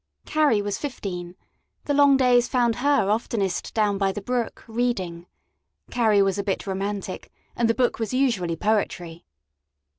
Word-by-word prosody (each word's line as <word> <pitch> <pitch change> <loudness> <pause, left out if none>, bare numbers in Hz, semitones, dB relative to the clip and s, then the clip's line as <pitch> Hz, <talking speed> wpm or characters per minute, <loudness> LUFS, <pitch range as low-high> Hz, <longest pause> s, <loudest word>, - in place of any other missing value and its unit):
Carrie 290 -9 +2
was 205 -1 -3
fifteen; 185 -10 -5 0.5
the 290 - 0
long 285 -1 +5
days 245 -2 +4
found 240 -3 +1
her 280 -5 +2
oftenest 210 -3 -1
down 205 -3 +1
by 195 -1 +2
the 205 - -5
brook, 240 +3 -3
reading 220 -8 -2 0.6
Carrie 215 -4 +3
was 195 +1 0
a - - -1
bit 195 -1 -2
romantic, 195 0 -4 0.2
and 235 -1 +1
the 230 - +2
book 250 -2 +1
was 225 -2 -2
usually 230 -11 +1
poetry. 175 -4 -2
215 Hz, 150 wpm, -24 LUFS, 195-245 Hz, 0.6 s, long